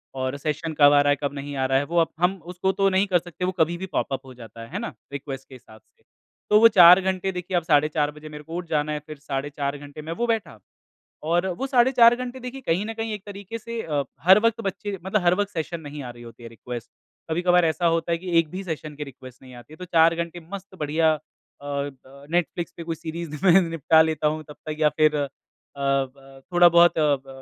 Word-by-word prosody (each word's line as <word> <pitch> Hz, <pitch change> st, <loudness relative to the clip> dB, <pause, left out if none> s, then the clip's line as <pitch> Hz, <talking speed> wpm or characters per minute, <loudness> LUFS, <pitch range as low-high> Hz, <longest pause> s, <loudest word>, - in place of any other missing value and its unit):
और 130 Hz, +1 st, -2 dB
सेशन 155 Hz, +2 st, -3 dB
कब 145 Hz, -1 st, +8 dB
आ 145 Hz, -, +6 dB
रहा 145 Hz, -, +2 dB
है, -, -, +3 dB
कब 140 Hz, -, -1 dB
नहीं 145 Hz, 0 st, -6 dB
आ 135 Hz, -1 st, 0 dB
रहा 135 Hz, 0 st, +2 dB
है 135 Hz, -, +1 dB
वो 170 Hz, +4 st, -3 dB
अब 165 Hz, -, 0 dB
हम 180 Hz, +2 st, +2 dB
उसको 180 Hz, +2 st, -1 dB
तो 195 Hz, 0 st, +2 dB
नहीं 190 Hz, +1 st, +2 dB
कर 180 Hz, -2 st, +3 dB
सकते, 175 Hz, +1 st, -6 dB
वो 185 Hz, -, 0 dB
कभी 165 Hz, +2 st, +2 dB
भी 190 Hz, -, -5 dB
पॉप-अप 135 Hz, -7 st, -3 dB
हो 130 Hz, -, -11 dB
जाता 115 Hz, -2 st, -12 dB
है, 115 Hz, -, -9 dB
है -, -, -3 dB
ना? -, -, -5 dB, 0.2 s
रिक्वेस्ट 135 Hz, -1 st, -7 dB
के 135 Hz, -, -11 dB
हिसाब 110 Hz, -3 st, -16 dB
से। -, -, -38 dB, 0.5 s
तो 210 Hz, -, +6 dB
वो 230 Hz, -, +9 dB
4 180 Hz, -3 st, +8 dB
घंटे 190 Hz, 0 st, -1 dB
देखिए 180 Hz, 0 st, -3 dB
अब 175 Hz, -, 0 dB
साढ़े 150 Hz, -2 st, +3 dB
4 150 Hz, -1 st, 0 dB
बजे 150 Hz, +1 st, -11 dB
मेरे 150 Hz, 0 st, -9 dB
को 165 Hz, +2 st, -8 dB
उठ 175 Hz, 0 st, -4 dB
जाना 150 Hz, -1 st, 0 dB
है, 150 Hz, -, -2 dB
फिर 155 Hz, -1 st, -8 dB
साढ़े 140 Hz, 0 st, -4 dB
4 140 Hz, 0 st, -3 dB
घंटे 145 Hz, +1 st, -10 dB
मैं 160 Hz, +2 st, -5 dB
वो 240 Hz, +7 st, -2 dB
बैठा 220 Hz, -, -2 dB, 0.6 s
और 170 Hz, +3 st, +1 dB
वो 270 Hz, -, -2 dB
साढ़े 255 Hz, -1 st, +4 dB
4 235 Hz, -2 st, +6 dB
घंटे 250 Hz, +1 st, -6 dB
देखिए, 255 Hz, +2 st, -7 dB
कहीं 190 Hz, -2 st, 0 dB
न 225 Hz, -, -4 dB
कहीं 225 Hz, -1 st, -4 dB
एक 205 Hz, -2 st, -7 dB
तरीके 205 Hz, +2 st, -7 dB
से 230 Hz, +1 st, -5 dB
अ, 145 Hz, -3 st, -1 dB, 0.2 s
हर 190 Hz, +6 st, +7 dB
वक़्त 230 Hz, 0 st, +1 dB
बच्चे 200 Hz, 0 st, -4 dB
मतलब 195 Hz, +2 st, +1 dB
हर 175 Hz, 0 st, +4 dB
वक़्त 205 Hz, 0 st, -1 dB
सेशन 165 Hz, 0 st, -4 dB
नहीं 145 Hz, -1 st, -8 dB
आ 125 Hz, -, -7 dB
रही 120 Hz, 0 st, -13 dB
होती 120 Hz, 0 st, -13 dB
है, 115 Hz, -, -8 dB
रिक्वेस्ट। 120 Hz, +1 st, -8 dB, 0.4 s
कभी-कभार 175 Hz, +1 st, +3 dB
ऐसा 165 Hz, +2 st, 0 dB
होता 165 Hz, 0 st, +1 dB
है 170 Hz, -, +1 dB
कि 175 Hz, 0 st, -1 dB
एक 165 Hz, -2 st, 0 dB
भी 190 Hz, +2 st, -5 dB
सेशन 155 Hz, -4 st, -6 dB
की 150 Hz, -, -5 dB
रिक्वेस्ट 130 Hz, -2 st, -13 dB
नहीं 130 Hz, -1 st, -13 dB
आती 120 Hz, +5 st, -14 dB
है। -, -, -13 dB
तो 180 Hz, -, -8 dB
4 165 Hz, -1 st, +4 dB
घंटे 170 Hz, +1 st, -4 dB
मस्त 195 Hz, -1 st, -8 dB
बढ़िया 155 Hz, +2 st, +2 dB, 0.5 s
अ, -, -, -12 dB
अ, 140 Hz, 0 st, -3 dB, 0.4 s
नैटफ्लिक्स 175 Hz, 0 st, -1 dB
पे 170 Hz, -, -6 dB
कोई 165 Hz, 0 st, -4 dB
सीरीज़ 160 Hz, -1 st, -6 dB
में 190 Hz, +1 st, +7 dB
निपटा 165 Hz, -1 st, +3 dB
लेता 160 Hz, -1 st, +1 dB
हूँ 155 Hz, +1 st, -2 dB
तब 150 Hz, -, -10 dB
तक 155 Hz, -, -3 dB
या 155 Hz, -1 st, +4 dB
फिर 155 Hz, -1 st, +4 dB
अ, 145 Hz, -1 st, -1 dB, 0.5 s
ब 135 Hz, -1 st, -2 dB
थोड़ा-बहुत 175 Hz, -1 st, +6 dB
अ, 150 Hz, -2 st, +3 dB
ब, 135 Hz, 0 st, -15 dB
160 Hz, 255 wpm, -24 LUFS, 145-185 Hz, 0.6 s, वो